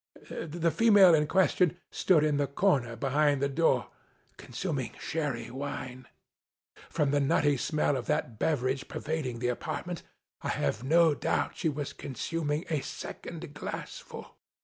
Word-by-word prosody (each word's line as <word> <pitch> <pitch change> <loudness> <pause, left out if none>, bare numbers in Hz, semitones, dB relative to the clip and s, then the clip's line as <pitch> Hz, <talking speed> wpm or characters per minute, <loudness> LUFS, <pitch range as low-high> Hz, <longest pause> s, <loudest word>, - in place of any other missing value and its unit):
The 165 +1 -1
female 200 0 +7
in 150 -1 +3
question 180 -1 +3
stood 165 -5 +3
in 150 -2 +2
the 145 -1 +1
corner 140 -7 +1
behind 140 +3 +2
the 140 - +1
door, 155 +4 +1 0.4
consuming 135 -2 -4
Sherry 140 -8 -3
Wine. 130 -2 -6 0.8
From 150 -4 +1
the 145 - +3
nutty 145 +1 +3
smell 150 +2 0
of 130 - -4
that 110 -3 -1
beverage 130 -3 0
per - - -5
vading 145 -7 -3
the 125 - +1
apartment, 165 +7 -4 0.4
I - - -3
have 85 - -1
no 165 +3 +5
doubt - - -1
she 160 - +1
was 145 -1 -4
consuming 150 +3 -3
a 155 -4 0
second 160 +3 -7
glassful. 150 - -7
145 Hz, 145 wpm, -29 LUFS, 135-165 Hz, 0.8 s, female